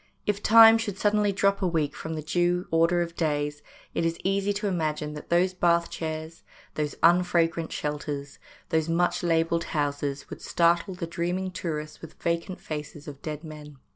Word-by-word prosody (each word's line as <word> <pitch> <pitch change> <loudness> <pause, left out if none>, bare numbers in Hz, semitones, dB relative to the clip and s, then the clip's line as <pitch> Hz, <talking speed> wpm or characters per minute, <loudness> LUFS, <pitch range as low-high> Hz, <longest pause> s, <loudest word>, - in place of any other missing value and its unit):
If 205 -1 -1
Time 225 +1 +8
should 205 -4 -3
suddenly 205 0 +2
drop 200 0 +1
a 185 - +2
week 155 -4 -1
from 160 0 -5
the 155 - -5
due 175 +3 0
order 165 +2 +3
of 170 0 -8
days, 145 -2 -1 0.3
it - - -1
is 165 0 0
easy 195 +1 +1
to 205 +1 -4
imagine 155 -5 -1
that 150 - -9
those 180 +2 +3
bath 170 -1 +2
chairs, 160 0 -5 0.3
those 150 -1 -2
unfragrant 170 -1 +3
shelters, 145 -1 -4 0.3
those 160 -1 +1
much 175 +1 +1
labelled 165 0 +1
houses 145 -1 -2
would - - -8
startle 170 +2 +1
the 180 -1 -4
dreaming 175 +3 -2
tourists 155 -4 -5
with 165 - -11
vacant 170 +2 -2
faces 150 0 -7
of 140 -2 -9
dead 155 0 -5
men. 150 -2 -10
170 Hz, 170 wpm, -26 LUFS, 150-180 Hz, 0.3 s, Time